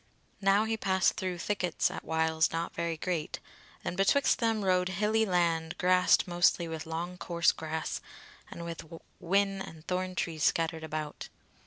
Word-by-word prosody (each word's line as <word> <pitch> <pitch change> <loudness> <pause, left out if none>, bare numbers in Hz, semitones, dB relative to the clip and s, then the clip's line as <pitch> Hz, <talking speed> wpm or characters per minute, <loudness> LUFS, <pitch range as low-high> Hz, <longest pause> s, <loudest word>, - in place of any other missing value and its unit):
Now 195 +2 +4
he 220 0 -1
passed 190 -3 +2
through 185 -1 -3
thickets 180 -2 0
at - - -6
whiles 160 0 +1
not 165 +1 -3
very 170 -1 -2
great, 165 -2 -3 0.5
and - - -2
betwixt 195 +9 +3
them 225 -4 +1
rode 180 -1 +2
hilly 215 +4 +1
land 165 -3 +1
grassed 180 +1 +4
mostly 175 -1 +2
with 160 -1 -6
long 175 +3 -4
coarse 170 -1 +2
grass, 160 0 -4 0.5
and 170 - -7
with 170 -1 -5 0.4
whin 195 +2 +1
and 160 -4 -9
thorn 185 0 -2
trees 160 -4 -2
scattered 165 -1 +1
about. 155 -1 -5
175 Hz, 155 wpm, -30 LUFS, 160-190 Hz, 0.5 s, Now